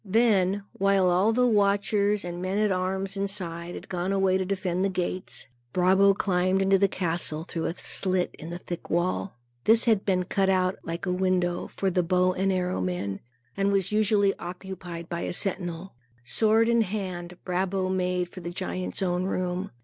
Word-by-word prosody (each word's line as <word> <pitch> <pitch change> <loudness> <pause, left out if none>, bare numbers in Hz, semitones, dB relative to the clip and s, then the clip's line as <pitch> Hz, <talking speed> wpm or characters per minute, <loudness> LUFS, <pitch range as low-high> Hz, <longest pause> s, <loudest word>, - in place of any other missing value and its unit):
Then, 200 -2 +2
while 195 -2 +3
all 190 +5 +3
the 250 +2 +3
watchers 205 -2 +2
and 175 0 -5
men 185 +2 -1
at 210 -1 +2
arms 190 +1 -1
inside, 180 -4 -4
had - - -9
gone 180 +1 -2
away 195 -1 +2
to - - 0
defend 185 -1 -1
the 195 - +2
gates, 185 0 -2 0.3
Brabo 190 +2 +4
climbed 185 0 +1
into 195 0 +3
the 200 - +4
castle, 165 -4 -1
through 165 -2 -4
a 165 - -3
slit 185 -2 -1
in 160 - -7
the 175 - -5
thick 175 -1 -7
wall. 175 -1 -1 0.3
This 225 +2 +6
had 220 -4 +3
been 185 -2 +1
cut 195 +1 +1
out, 185 0 +1
like 165 +2 -4
a 180 - 0
window, 180 -1 0
for 195 -1 -2
the 180 - +2
bow 180 +1 +2
and 190 +1 0
arrow 185 0 -1
men, 140 - -2 0.4
and 200 0 +1
was 195 -1 +1
usually 210 -2 +3
occupied 175 -1 -7
by 170 0 -4
a - - -3
sentinel. 180 -1 -2 0.3
Sword 220 - +3
in 235 0 +4
hand, 180 -4 -4
Brabo 185 +1 0
made 180 -1 0
for 180 - -10
the 170 -1 -5
giant's 185 +2 -3
own 180 0 0
room. 185 +1 -2
185 Hz, 180 wpm, -27 LUFS, 180-195 Hz, 0.4 s, This